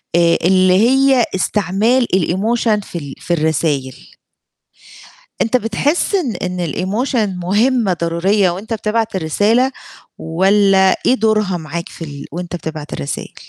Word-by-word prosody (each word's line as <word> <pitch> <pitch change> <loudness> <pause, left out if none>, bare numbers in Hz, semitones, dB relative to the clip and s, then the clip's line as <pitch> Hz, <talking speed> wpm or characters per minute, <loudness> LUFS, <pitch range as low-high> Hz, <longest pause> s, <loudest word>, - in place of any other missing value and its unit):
آآ 170 -1 +4
اللي 185 +1 +4 0.2
هي 270 -2 +4
استعمال 210 +6 +1
الemotion 210 +5 +1
في 175 - -7
ال 140 -4 -7
في 175 - -2
الرسايل 150 -4 -1 1.5
أنت 230 +3 +1
بتحس 255 - -1
إن 305 - 0
إن 180 -1 -3
الemotion 205 -1 -2
مهمة 215 0 +1
ضرورية 180 +4 +1
وأنت 200 +6 -5
بتبعت 220 0 -1
الرسالة؟ 210 - +1 0.5
والّا 190 +3 +3
إيه - - +5
دورها 215 -5 +1
معاك 170 +1 -6
في 165 - -9
ال 145 -2 -8
وأنت 175 +1 -5
بتبعت 155 -3 -7
الرسايل؟ 70 - -5
190 Hz, 125 wpm, -17 LUFS, 170-225 Hz, 1.5 s, إيه